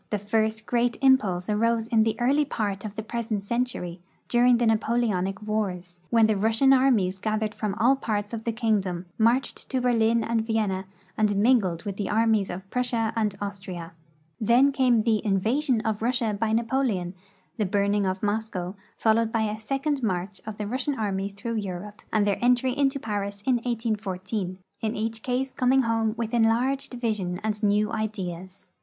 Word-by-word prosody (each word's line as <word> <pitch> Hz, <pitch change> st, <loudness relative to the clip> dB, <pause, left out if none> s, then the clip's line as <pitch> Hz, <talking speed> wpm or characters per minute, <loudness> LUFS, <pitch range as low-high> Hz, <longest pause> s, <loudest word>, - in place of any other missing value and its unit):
Tlie 210 Hz, -, -1 dB
first 215 Hz, +1 st, 0 dB
great 240 Hz, 0 st, +1 dB
impulse 210 Hz, -10 st, +3 dB
arose 225 Hz, +2 st, +1 dB
in 225 Hz, -1 st, +3 dB
the 220 Hz, 0 st, 0 dB
early 275 Hz, +5 st, +3 dB
part 205 Hz, -8 st, -3 dB
of 210 Hz, -1 st, -6 dB
the 220 Hz, -, -4 dB
iH'esent 225 Hz, -2 st, -3 dB
century, 200 Hz, -6 st, -2 dB, 0.3 s
during 245 Hz, 0 st, +5 dB
the 240 Hz, -, +1 dB
Napoleonic 215 Hz, -4 st, 0 dB
wars, 185 Hz, -5 st, -3 dB
when 230 Hz, -2 st, +5 dB
the 215 Hz, -1 st, +2 dB
Rus 220 Hz, +3 st, +1 dB
sian 270 Hz, +1 st, +6 dB
armies 225 Hz, -9 st, +3 dB
gathered 215 Hz, +1 st, -1 dB
from 210 Hz, -3 st, -3 dB
all 240 Hz, +5 st, +4 dB
parts 210 Hz, -4 st, -3 dB
of 225 Hz, -1 st, -4 dB
the 230 Hz, -, -1 dB
kingdom, 205 Hz, -6 st, -1 dB
marched 235 Hz, +4 st, +1 dB
to 260 Hz, -, 0 dB
Berlin 230 Hz, -2 st, +2 dB
and 230 Hz, 0 st, 0 dB
Vienna, 210 Hz, -4 st, -1 dB, 0.3 s
and 210 Hz, -2 st, +2 dB
mingled 200 Hz, -6 st, +2 dB
with 200 Hz, -1 st, -5 dB
the 205 Hz, -, -2 dB
armies 220 Hz, -2 st, +2 dB
of 185 Hz, +2 st, -6 dB
Prussia 235 Hz, -3 st, 0 dB
and 215 Hz, -3 st, 0 dB
Austria. 190 Hz, -4 st, -6 dB, 0.5 s
Then 240 Hz, +6 st, +4 dB
came 250 Hz, -5 st, +3 dB
the 220 Hz, -2 st, +1 dB
invasion 225 Hz, +5 st, +1 dB
of 220 Hz, -2 st, -2 dB
Russia 235 Hz, -2 st, 0 dB
by 215 Hz, +2 st, -1 dB
Napoleon, 225 Hz, -6 st, 0 dB, 0.4 s
the 210 Hz, -4 st, 0 dB
burning 200 Hz, 0 st, +1 dB
of 190 Hz, +2 st, -3 dB
Moscow, 205 Hz, -3 st, -2 dB, 0.2 s
followed 225 Hz, 0 st, +2 dB
l)y 220 Hz, -2 st, +1 dB
the 215 Hz, -, -7 dB
second 275 Hz, +4 st, -1 dB
march 190 Hz, -2 st, -2 dB
of 215 Hz, -1 st, -5 dB
the 210 Hz, -, -3 dB
Rus 250 Hz, +5 st, -3 dB
sian 290 Hz, -2 st, -1 dB
armies 200 Hz, -2 st, -2 dB
through 230 Hz, +3 st, -4 dB
Europe, 200 Hz, 0 st, -5 dB
and 210 Hz, -2 st, +2 dB
their 200 Hz, -1 st, 0 dB
entry 250 Hz, +1 st, +3 dB
into 275 Hz, -1 st, +1 dB
Paris 200 Hz, -3 st, -4 dB
in 255 Hz, -2 st, +3 dB
1814, 210 Hz, -5 st, -3 dB, 0.2 s
in 220 Hz, 0 st, -1 dB
each 225 Hz, +1 st, -3 dB
case 255 Hz, +2 st, -2 dB
coming 260 Hz, +1 st, +3 dB
home 225 Hz, -1 st, 0 dB
with 230 Hz, 0 st, -3 dB
enlarged 240 Hz, +4 st, +1 dB
vision 210 Hz, -7 st, -2 dB
and 215 Hz, -1 st, -2 dB
new 210 Hz, 0 st, +2 dB
ideas. 190 Hz, -3 st, -5 dB
220 Hz, 175 wpm, -26 LUFS, 200-235 Hz, 0.5 s, sian